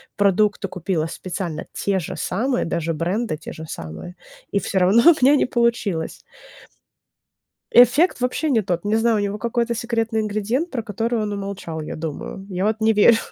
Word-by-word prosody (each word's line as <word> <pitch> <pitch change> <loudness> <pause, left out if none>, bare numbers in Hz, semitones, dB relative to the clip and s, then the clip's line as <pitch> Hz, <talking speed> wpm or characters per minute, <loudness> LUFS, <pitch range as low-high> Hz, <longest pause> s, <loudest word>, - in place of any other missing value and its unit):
продукты 205 +1 +2
купила 180 -3 -2
специально 175 -2 -5
те 195 -1 0
же 165 - -6
самые, 245 +7 -1
даже 165 0 -2
бренды 175 +4 -2
те 155 - -9
же 160 - -8
самые, 85 - -8 0.4
и 200 - +2
всё 195 - -1
равно 195 +6 +4
у 300 -6 +1
меня 285 +2 +6
не - - +3
получилось. 235 -9 -1 1.5
Эффект 245 +9 +5
вообще 250 +5 0
не 235 -6 +3
тот, 175 -3 -2
не 210 +1 +1
знаю, 225 0 +2
у - - +1
него 205 0 -2
какой-то 235 +1 -1
секретный 230 -1 -1
ингредиент, 215 - -1
про 245 -7 -3
который 225 +2 -2
он 210 -1 -2
умолчал, 195 -5 -5
я 155 - -6
думаю. 160 +4 -6
Я 185 +1 -2
вот 220 +1 0
не 220 0 +4
верю. 220 +2 +6
210 Hz, 175 wpm, -22 LUFS, 180-235 Hz, 1.5 s, меня